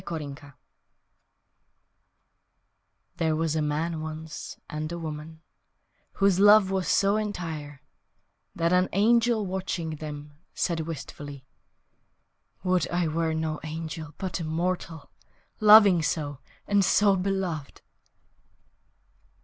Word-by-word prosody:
Perhaps 145 -3 -7 2.6
THERE 160 -3 +1
was 160 0 0
a 155 - +1
man, 155 +2 -1
once, 155 0 -7
and 155 +1 -5
a 170 - -4
woman 160 0 -7 0.7
Whose 195 -2 +2
love 205 -1 +7
was 190 -1 -1
so 200 +1 +3
entire 160 -8 -5 0.7
That 170 +1 +1
an 180 +1 +3
angel, 230 +1 +3
watching 180 -4 -3
them, 145 -1 -8 0.2
Said 170 -2 0
wistfully, 145 -3 -7 1.2
"Would 185 -1 +1
I 175 -2 0
were 160 0 -1
no 160 -1 -2
angel 160 -1 -6
But 185 -3 -3
a - - -4
mortal, 165 -1 -3 0.5
Loving 210 -4 +8
so, 145 -3 -2 0.3
and 205 -1 +3
so 200 +1 +4
beloved!" 185 -6 -3
165 Hz, 105 wpm, -27 LUFS, 155-190 Hz, 2.6 s, Loving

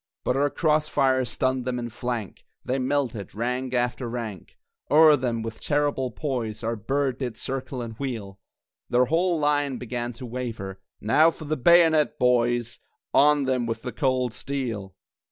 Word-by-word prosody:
But 125 - 0
our 145 +1 +2
cross 155 0 +1
fire 130 -2 +2
stunned 130 +1 -1
them 125 0 -2
in 120 -1 -4
flank, 120 -3 -5 0.2
They 130 +2 0
melted, 130 -7 -2
rank 125 +3 -2
after 120 0 -1
rank 115 -6 -6 0.3
(O'er 155 0 +7
them, 120 -4 -2
with 115 0 -6
terrible 145 -3 0
poise, 120 -4 -4
Our 115 +1 -1
Bird 135 +4 -1
did 120 -5 -4
circle 130 0 -4
and 115 -1 -6
wheel!) 110 -8 -5 0.5
Their 125 +1 +4
whole 170 +5 +1
line 145 -3 +1
began 120 0 -4
to 120 +3 -9
waver 115 -6 -5 0.2
Now 150 +10 +5
for 160 -1 -8
the 155 +1 -1
bayonet, 160 +1 +5
boys! 120 -1 +1 0.3
On 145 0 +5
them 130 -3 0
with 115 0 -4
the 125 - -4
cold 130 -4 0
steel! 115 -9 -4
125 Hz, 160 wpm, -25 LUFS, 115-140 Hz, 0.5 s, O'er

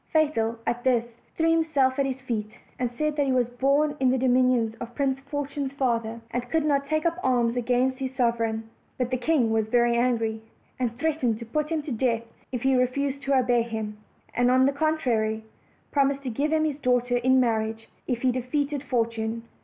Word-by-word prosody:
Fatal, 260 -8 +1
at 240 0 -1
this, 245 -3 +3 0.3
threw 330 0 +3
himself 290 -5 +2
at 275 - +2
his 265 -1 -3
feet, 220 -5 -3 0.3
and 250 -1 0
said 305 +4 -1
that 285 -2 +1
he - - +2
was 250 -2 +2
born 280 +4 +2
in 260 -1 +3
the 260 - +2
dominions 250 -3 +3
of 240 0 -7
Prince 270 -1 0
Fortune's 280 -1 -4
father, 230 -4 -1
and 245 0 -3
could 320 +1 +1
not 280 -2 +2
take 310 +1 0
up 335 +1 0
arms 240 -4 +2
against 250 +2 +1
his 265 -1 -4
sovereign. 230 -2 0 0.3
But 250 0 -1
the 255 - +1
king 250 -4 +2
was 220 -1 +1
very 240 +1 +3
angry, 230 -2 0 0.4
and 235 -2 -1
threatened 290 -7 0
to 235 - -8
put 300 +6 -2
him 320 -2 -1
to 295 - -6
death 230 -1 0 0.3
if 250 -2 -3
tie 265 0 +3
refused 265 +2 0
to 275 -1 +1
obey 245 -2 +3
him; 220 -2 -4 0.4
and, 245 0 +2
on 260 +1 +5
the 275 - +3
contrary, 245 -8 0 0.5
promised 280 -1 +1
to 255 - -3
give 285 +7 -1
him 315 0 +2
his 295 -2 -2
daughter 245 -2 +2
in 260 +2 +3
marriage 225 -2 0 0.2
if 245 -1 -2
he 255 - +4
de 255 +1 -2
feated 285 +2 -1
Fortune. 230 -3 -1
255 Hz, 200 wpm, -26 LUFS, 235-280 Hz, 0.5 s, on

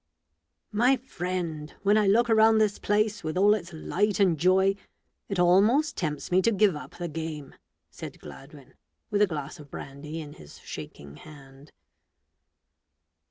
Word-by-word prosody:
"My 245 +5 +3
friend, 180 -10 -5
when 205 +1 +4
I 215 -2 +3
look 230 +5 +4
around 220 -1 +5
this 215 -2 +1
place, 210 +1 0
with 155 +2 -3
all 205 +2 +5
its 185 -4 -4
light 195 +6 -1
and 185 -4 +4
joy, 185 +4 +3 0.6
it 195 - -2
almost 205 - +3
tempts 150 -2 -4
me 185 +1 +4
to 230 - +2
give 205 -4 +3
up 150 - -10
the 175 - -4
game," 155 -2 -6 0.4
said - - -9
Gladwin, - - -13 0.4
with 205 - +1
a 210 - +5
glass 150 -1 -6
of 145 -1 -13
brandy 150 +5 -8
in 150 -2 -8
his 75 -1 -14
shaking 70 0 -10
hand. 140 -1 -15
185 Hz, 155 wpm, -27 LUFS, 155-210 Hz, 0.6 s, around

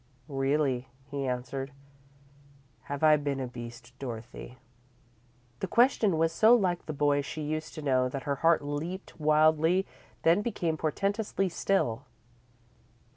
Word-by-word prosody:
"Really," 135 -2 0 0.2
he 140 -1 -2
answered. 130 +2 -4 1.1
"Have 145 +1 -5
I 155 -1 +7
been 145 -2 -2
a 130 - -2
beast, 120 0 -9
Dorothy?" 125 0 -7 1.0
The 195 - -2
question 220 -4 +3
was 165 0 +2
so 220 +7 +6
like 185 -6 0
the - - -2
boy 145 -1 +2
she 155 +2 -6
used 155 +1 -4
to 155 - -6
know 130 -2 +2
that 135 +1 -5
her 140 -1 -1
heart 165 +1 +3
leaped 160 +7 -5
wildly, 155 +4 +3 0.4
then 170 +5 +4
became 175 -8 -1
portentously 195 +5 -1
still. 145 -9 0
150 Hz, 130 wpm, -29 LUFS, 135-170 Hz, 1.1 s, I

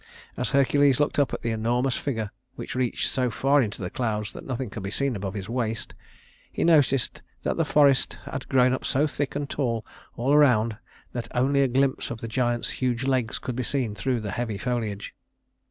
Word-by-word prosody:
As 125 - 0
Hercules 140 -1 +4
looked 145 0 +1
up 140 -4 +2
at - - -5
the 115 - 0
enormous 120 +3 +1
figure, 110 -7 -3 0.2
which - - -6
reached 125 -2 0
so 130 -2 +1
far 135 +6 +3
into 105 -4 -3
the 90 - -4
clouds 105 -3 -2
that - - -8
nothing 130 -3 -3
could 105 - -6
be 95 - -4
seen 135 +4 0
above 100 0 -4
his 95 -2 -5
waist, 115 -2 -2 0.6
he - - -1
noticed 145 -6 +3 0.2
that - - 0
the 165 - +2
forests 145 -3 +3
had 130 0 -6
grown 130 -1 +4
up 130 - -2
so 140 +3 +2
thick 145 -2 -3
and 145 0 -2
tall 115 -7 -1 0.3
all 130 +4 +1
around 120 -7 +4 0.4
that 120 -1 -4
only 140 +3 +3
a 135 - +4
glimpse 135 +1 +1
of 120 - -5
the 115 - -5
giant's 120 +1 0
huge 125 -1 0
legs 130 -4 0
could 125 - -5
be 130 - -1
seen 125 -3 -1
through 120 +3 -1
the 105 -2 -4
heavy 115 -1 -2
foliage. 110 -3 -3
125 Hz, 205 wpm, -26 LUFS, 115-135 Hz, 0.6 s, Hercules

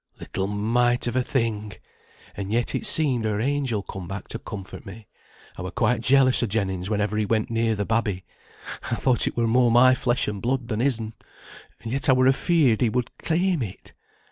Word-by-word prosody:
"Little 95 0 -4
mite 120 +4 +1
of 120 0 -2
a 130 - +3
thing! 110 -5 -2 0.6
and 100 0 -5
yet 120 +2 0
it 220 - -1
seemed 145 - +3
her 105 -1 -1
angel 130 -4 -1
come 95 -1 -8
back 95 +1 -7
to - - -5
comfort 100 -4 -9
me. 105 +2 -11 0.5
I - - -4
were - - -4
quite - - 0
jealous 130 0 +5
o' 120 - 0
Jennings 95 -3 -2
whenever 105 0 -1
he 110 - +1
went 110 +1 0
near 115 -1 +1
the 105 0 -2
babby. 105 -4 -1 0.6
I 120 - 0
thought 125 0 +2
it - - -4
were 120 - +2
more 120 +2 +3
my 125 +2 +6
flesh 125 -2 +1
and 105 -2 -4
blood 125 0 -2
than 110 -2 -2
his'n, 115 -4 -1 0.7
and 115 - -6
yet 135 +3 0
I - - +7
were 130 0 +3
afeared 135 -3 +2
he 120 - +3
would 125 +1 -3
claim 175 -1 0
it. 100 -6 -8
115 Hz, 200 wpm, -24 LUFS, 105-130 Hz, 0.7 s, I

